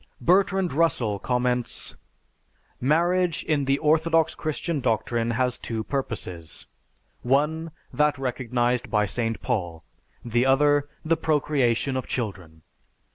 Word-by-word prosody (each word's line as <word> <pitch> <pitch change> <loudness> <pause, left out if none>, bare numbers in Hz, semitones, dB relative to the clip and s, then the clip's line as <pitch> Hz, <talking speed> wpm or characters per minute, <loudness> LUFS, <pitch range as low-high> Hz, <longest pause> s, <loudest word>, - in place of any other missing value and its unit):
Bertrand 190 0 +2
Russell 130 -10 +1
comments, 125 +1 -1 0.8
"Marriage 170 +5 +2
in 145 -3 0
the 135 +1 +2
orthodox 160 +1 +2
Christian 155 0 -3
doctrine 115 -1 0
has 125 +1 0
two 110 -2 -4
purposes: 100 - -5 0.6
one, 150 +6 +1 0.2
that 150 +2 +2
recognized 125 -1 -1
by 105 -1 +2
St. 115 +2 -2
Paul, 85 -9 -2 0.4
the 120 +1 +1
other, 145 +2 +3 0.2
the 165 +1 +2
procreation 140 -5 +1
of 130 - -3
children. 90 -9 -5
130 Hz, 110 wpm, -25 LUFS, 115-155 Hz, 0.8 s, other